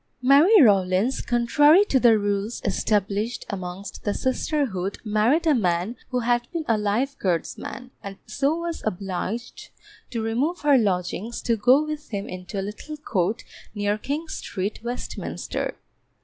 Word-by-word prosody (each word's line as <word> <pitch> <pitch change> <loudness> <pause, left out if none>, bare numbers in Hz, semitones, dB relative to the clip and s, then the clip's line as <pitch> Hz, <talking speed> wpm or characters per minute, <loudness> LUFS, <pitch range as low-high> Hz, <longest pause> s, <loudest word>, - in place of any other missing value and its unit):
Mary 300 - +7
Rawlins, 200 - +3
contrary 290 +10 +4
to 270 - +2
the 235 -3 +6
rules 205 +2 -1
established 205 +3 0
amongst 190 0 -6
the 205 - -1
sisterhood, 255 - -1
married 225 +10 +2
a 315 - +5
man 185 -1 0
who 250 -1 -1
had 240 0 +1
been 330 -2 -3
a 230 - +3
Life 215 +7 0
Guardsman, 190 +7 -3
and 195 -1 -8
so 275 +7 0
was 335 -1 -4
obliged 195 +3 -4 0.4
to 230 -3 -3
remove 260 +10 -1
her 290 -1 +5
lodgings 195 +2 -1
to 230 - +2
go 250 +7 +4
with 305 -1 -6
him 200 -2 -4
into 185 +2 -6
a - - -2
little 260 +9 -7
court 205 -7 -1 0.3
near 205 0 0
King 295 +8 -3
Street, 195 -8 -4
Westminster. 240 +1 -4
225 Hz, 145 wpm, -24 LUFS, 200-275 Hz, 0.4 s, Mary